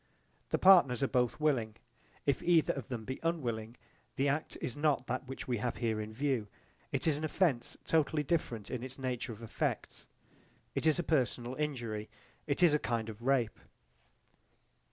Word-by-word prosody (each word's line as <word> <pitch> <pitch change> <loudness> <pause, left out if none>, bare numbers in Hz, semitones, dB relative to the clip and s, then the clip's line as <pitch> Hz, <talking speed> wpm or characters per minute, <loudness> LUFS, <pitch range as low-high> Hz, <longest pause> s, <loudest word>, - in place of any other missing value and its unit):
The - - +2
partners 155 -10 +6
are - - +3
both 125 +1 +1
willing. 125 -8 +1 0.5
If 140 -3 +2
either 170 -3 +4
of 135 -5 -6
them 115 -4 -5
be 130 +3 -4
unwilling, 120 -9 -2 0.4
the 140 +1 +2
act 145 +3 -2
is 120 - -3
not 145 -3 +1
that 130 +1 -3
which 135 - -6
we 120 -3 0
have 120 +2 -1
here 110 -3 0
in 105 0 -6
view: 125 -2 0 0.4
it - - -1
is 155 -3 +3
an 155 - -5
offence 155 -6 +1
totally 155 -1 +2
different 130 -8 -1
in 125 - -3
its 130 +1 -7
nature 130 -2 -2
of 115 +1 -9
effects: 115 - -3 0.7
it - - 0
is 155 - +4
a 175 - 0
personal 125 -5 0
injury; 120 -8 -3 0.4
it 145 +4 +1
is 165 -4 +7
a 150 - +3
kind 115 -4 -1
of 110 +1 -9
rape. 125 -3 +1
130 Hz, 175 wpm, -33 LUFS, 115-150 Hz, 0.7 s, is